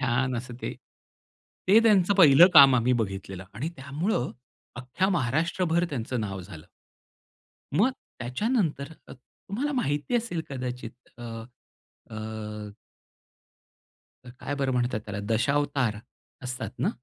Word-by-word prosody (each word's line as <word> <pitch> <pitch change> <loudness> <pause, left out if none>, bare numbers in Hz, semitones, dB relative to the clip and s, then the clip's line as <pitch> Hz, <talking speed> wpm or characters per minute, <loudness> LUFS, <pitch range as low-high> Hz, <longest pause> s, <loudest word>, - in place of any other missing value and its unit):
छान 130 0 0
असं 125 +1 -6
ते. - - -3 1.0
ते 205 +4 +8
त्यांचं 200 -3 +4
पहिलं 170 -2 +8
काम 140 -3 +10
आम्ही 125 +2 +2
बघितलेलं. 95 -2 -6
आणि 130 +9 -3
त्यामुळं 140 - -2 0.5
अख्ख्या 130 +10 -1
महाराष्ट्रभर 165 +5 +1
त्यांचं 125 -2 -3
नाव 95 -2 -4
झालं. 90 -3 -11 1.1
मग 235 +8 +4 0.3
त्याच्यानंतर 155 - -1 0.2
तुम्हाला 210 - -6
माहिती 150 - -1
असेल 225 -8 -2
कदाचित 125 -2 -7
अ, - - -9 0.9
अ. 110 -1 -6 1.6
काय 130 +3 -6
बरं 135 -2 -1
म्हणतात 120 -3 0
त्याला? 105 -1 -5
दशावतार 135 -2 +1 0.5
असतातना 125 0 -3
130 Hz, 105 wpm, -27 LUFS, 115-165 Hz, 1.6 s, काम